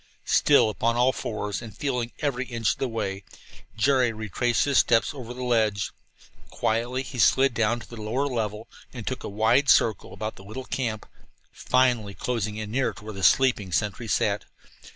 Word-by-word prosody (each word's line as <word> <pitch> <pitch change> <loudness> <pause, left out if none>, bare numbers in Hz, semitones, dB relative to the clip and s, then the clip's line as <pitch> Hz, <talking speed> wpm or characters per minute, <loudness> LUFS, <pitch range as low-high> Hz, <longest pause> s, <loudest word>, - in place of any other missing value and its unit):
Still 110 - +4
upon 115 +2 0
all 125 +2 +4
fours, 105 -2 -4
and 115 -4 -10
feeling 125 -4 -2
every 130 -4 -1
inch 115 -4 0
of - - -5
the 135 - 0
way, 100 -4 -3 0.5
Jerry 130 0 +3
retraced 110 +2 0
his 140 -2 +3
steps 115 0 +3
over 125 -4 -8
the 125 +1 -6
ledge. 110 -5 +1 0.6
Quietly 120 +4 -1
he 130 -2 -7
slid 135 +1 +4
down 115 0 +1
to - - -12
the 115 -2 -9
lower 120 +7 -1
level 110 -5 -3 0.2
and 120 -4 -8
took 130 - -4
a - - -4
wide 110 +7 +2
circle 110 -4 +3
about 110 0 -5
the 95 - -12
little 110 +6 -7
camp, 115 -5 -3 0.5
finally 120 -6 +1
closing 110 -4 -2
in 105 -1 -5
near 130 +2 0
to 110 - -14
where 110 - -6
the 95 - -7
sleeping 115 -4 +3
sentry 105 +5 -1
sat. 105 -2 0
115 Hz, 180 wpm, -25 LUFS, 105-125 Hz, 0.6 s, Still